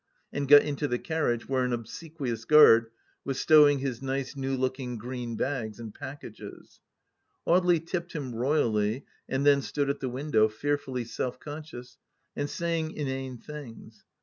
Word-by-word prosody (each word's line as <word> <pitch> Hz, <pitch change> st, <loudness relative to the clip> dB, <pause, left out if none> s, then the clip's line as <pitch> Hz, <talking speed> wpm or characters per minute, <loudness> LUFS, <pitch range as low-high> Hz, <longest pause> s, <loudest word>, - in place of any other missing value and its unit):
and 140 Hz, -1 st, -2 dB
got 145 Hz, +1 st, +9 dB
into 145 Hz, 0 st, -2 dB
the 125 Hz, -, 0 dB
carriage, 135 Hz, -6 st, -1 dB
where 130 Hz, -1 st, +1 dB
an 125 Hz, -, -1 dB
obsequious 120 Hz, 0 st, -5 dB
guard 115 Hz, -6 st, +7 dB, 0.3 s
was 135 Hz, -1 st, -3 dB
stowing 150 Hz, -2 st, +6 dB
his 130 Hz, -3 st, -3 dB
nice 135 Hz, +1 st, -3 dB
new 135 Hz, -1 st, -2 dB
looking 130 Hz, -1 st, -2 dB
green 120 Hz, +1 st, -5 dB
bags 120 Hz, -4 st, -3 dB
and 110 Hz, -3 st, -8 dB
pack 145 Hz, 0 st, -8 dB
ages.... 110 Hz, -, -11 dB, 0.7 s
Audely 175 Hz, -1 st, +4 dB
tipped 175 Hz, 0 st, -4 dB
him 135 Hz, -6 st, -4 dB
royally, 115 Hz, -2 st, 0 dB, 0.2 s
and 135 Hz, +2 st, 0 dB
then 140 Hz, -1 st, +5 dB
stood 140 Hz, 0 st, -1 dB
at 140 Hz, -, -6 dB
the 130 Hz, -, -3 dB
win 135 Hz, +5 st, -5 dB
dow, 110 Hz, -3 st, +5 dB
fearfully 130 Hz, +2 st, -2 dB
self 125 Hz, +2 st, -4 dB
conscious 145 Hz, -5 st, -9 dB, 0.2 s
— -, -, -48 dB
and 145 Hz, 0 st, -2 dB
saying 165 Hz, -1 st, -2 dB
inane 135 Hz, -3 st, -4 dB
things. 145 Hz, -3 st, -11 dB
135 Hz, 165 wpm, -28 LUFS, 120-145 Hz, 0.7 s, got